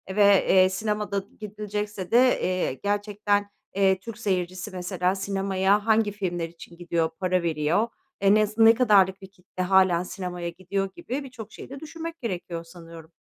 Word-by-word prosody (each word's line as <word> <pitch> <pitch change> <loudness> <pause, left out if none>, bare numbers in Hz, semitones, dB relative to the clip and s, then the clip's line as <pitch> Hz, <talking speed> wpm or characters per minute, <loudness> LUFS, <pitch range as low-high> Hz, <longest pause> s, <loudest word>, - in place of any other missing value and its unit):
ve, 210 - +3 0.3
eee, 185 0 +6
sinemada 205 0 -2 0.2
gidilecekse 210 -2 -5
de, 235 - +5 0.2
eee, 185 -6 0
gerçekten, 205 0 0 0.3
eee, 190 -1 +3
Türk 225 +2 -9
seyircisi 185 -2 -2
mesela 180 0 -1
sinemaya 195 +1 0
hangi 220 -1 +3
filmler 175 -5 -3
için 170 0 -14
gidiyor, 170 -2 -1
para 185 -1 +1
veriyor? 165 +6 +1 0.3
Eee, 200 0 +5
nes 215 0 +2
ne 225 0 +8
kadarlık 200 -5 +3
bir 190 - -10
kitle 185 -1 -6
hâlâ 185 -2 +3
sinemaya 180 -3 -5
gidiyor 195 +2 -3
gibi 290 -5 -4
birçok 240 -5 -10
şeyi - - -11
de 275 +1 -8
düşünmek 330 +2 -7
gerekiyor 175 -6 -4
sanıyorum. 165 -1 -13
195 Hz, 155 wpm, -25 LUFS, 180-210 Hz, 0.3 s, ne